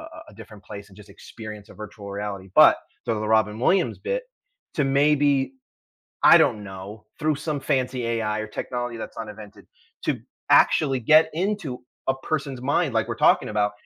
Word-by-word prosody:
a 320 0 -11
a - - -17
different 105 -3 -13
place, 100 -1 -9
and 95 - -18
just 105 - -15
experience 110 -2 -10
a - - -14
virtual 105 -1 -9
reality, 100 -1 -5
but - - +8 0.3
so 115 -2 -1
the 110 - -3
Robin 110 -1 +2
Williams 185 +6 +2
bit, - - -2 0.5
to 150 - +1
maybe 140 -1 +2 0.7
I - - +8
don't 105 -1 +2
know, 100 +2 -9
through 155 -1 0
some 150 -1 -3
fancy 130 -3 -1
AI 110 -2 -1
or 110 - -4
technology 120 +2 -4
that's - - -8
not 110 -1 -5
invented, 105 -1 -12 0.4
to - - 0 0.3
actually 135 -4 +4
get 155 +7 +5
into 180 -8 -2 0.3
a 135 - +3
person's 140 -5 -3
mind, 140 +2 0
like - - +1
we're - - -3
talking - - +2
about, 105 -1 0
115 Hz, 180 wpm, -24 LUFS, 105-145 Hz, 0.7 s, but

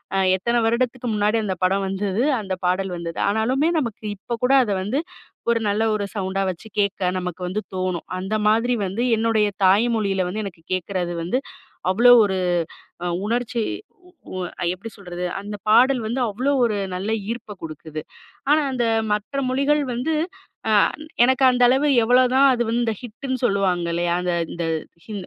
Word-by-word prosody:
அ - - +2 0.2
எத்தன 235 +5 +1
வருடத்துக்கு 245 +2 0
முன்னாடி 210 +2 +2
அந்த 190 -2 -1
படம் 195 +2 +2
வந்தது? 195 +3 -1 0.2
அந்த 190 -2 -4
பாடல் 185 +1 0
வந்தது? 170 -1 -6
ஆனாலுமே 245 +9 +1
நமக்கு 230 -6 -4
இப்ப 235 +4 -5
கூட 260 - +3
அத 210 - -2
வந்து 250 +10 -1 0.5
ஒரு 230 - +2
நல்ல 210 +2 +1
ஒரு 205 -1 -2
சவுண்டா 195 -1 -1
வச்சு 180 +5 -11
கேட்க 200 -1 0 0.2
நமக்கு 180 0 -5
வந்து 195 +4 -2
தோணும். 185 -2 -2
அந்த 190 +3 -2
மாதிரி 230 +3 +2
வந்து 195 +5 -3 0.2
என்னுடைய 220 -1 +2 0.2
தாய் 200 +5 +5
மொழியில 195 -4 0
வந்து 215 +4 -3
எனக்கு 175 -4 -9
கேட்கறது 180 -1 -2
வந்து 210 +10 0 0.5
அவ்ளோ 240 +5 +7
அ - - +7
ஒரு 190 -2 -1 0.9
உணர்ச்சி 235 +1 -1 0.7
உ - - -3 0.2
அ - - 0
எப்டி 200 +5 -9
சொல்றது? 180 -2 -6 0.2
அந்த 205 +1 -6
பாடல் 250 +4 +5
வந்து 240 +4 -2
அவ்ளோ 250 +7 -1
ஒரு 220 -3 +1 0.2
நல்ல 195 +4 -3 0.2
ஈர்ப்ப 230 -2 -5
குடுக்குது. 155 -1 -7 0.5
ஆனா 305 +1 +5
அந்த 250 -2 0 0.3
மற்ற 210 +6 -2
மொழிகள் 280 +3 +2
வந்து 265 +7 -1 0.6
அ - - +3 0.5
எனக்கு 260 +2 +3
அந்த 250 0 +1
அளவு 270 +4 +3
எவ்வளோதான் 255 +3 +4
அது 240 -1 +1
வந்து 235 +1 +1
இந்த 225 -1 0
ஹிட்டுன்னு 255 +3 -4
சொல்லுவாங்கல்லையா? 175 -4 +1
அந்த 180 0 0 0.2
இந்த 170 - -3 0.4
ஹி 220 - -8
215 Hz, 165 wpm, -22 LUFS, 190-245 Hz, 0.9 s, அவ்ளோ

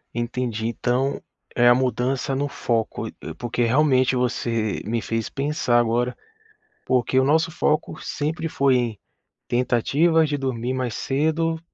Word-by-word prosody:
Entendi. 120 -2 -2
Então 125 +4 0 0.4
é 120 0 +5
a 120 - +8
mudança 130 +1 0
no 140 +2 0
foco 115 -5 -2
e - - -10
e - - -6
porque 120 0 -2
realmente 130 +1 +3
você 115 -3 -1
me 115 +2 -1
fez 115 0 -2
pensar 140 -4 +1
agora, 120 +1 0 0.7
porque 130 0 +2
o - - +3
nosso 160 +4 +3
foco 155 0 0
sempre 155 +3 -3
foi 125 -7 +1 0.5
tentativa 135 +7 +2
de 145 -1 -1
dormir 130 -2 -2
mais 130 -3 -2
cedo 160 +5 0
130 Hz, 140 wpm, -23 LUFS, 120-145 Hz, 0.7 s, a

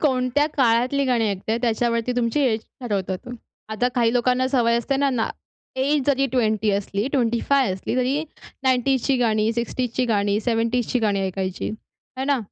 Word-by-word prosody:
कोणत्या 260 0 +2
काळातली 255 +2 +2
गाणी 240 -4 +1
ऐकताय 200 +4 -2
त्याच्यावरती 235 +1 0
तुमची 240 +3 +1
एज 235 -5 +2 0.2
ठरवतो 195 -6 -2
तो. 215 - -12 0.4
आता 220 +3 0
काही 235 -2 +2
लोकांना 250 +1 +2
सवय 235 -3 +2
असते 270 +4 -1
ना, 270 -5 +1 0.5
एज 280 +2 +1
जरी 275 -1 +2
20 220 -4 +1
असली, 200 +1 -1
25 250 -1 +2
असली 190 +6 -4
तरी 260 +4 +1 0.4
90ज 260 0 +2
ची 275 - +2
गाणी, 220 -2 +1
60ज 240 +1 -2
ची 255 - +2
गाणी, 205 -2 +1
70ज 230 +1 0
ची 250 - +2
गाणी 205 -4 +1
ऐकायची 185 0 -3 0.5
आहे 260 - -2
ना? 280 -1 +2
240 Hz, 165 wpm, -23 LUFS, 220-260 Hz, 0.5 s, कोणत्या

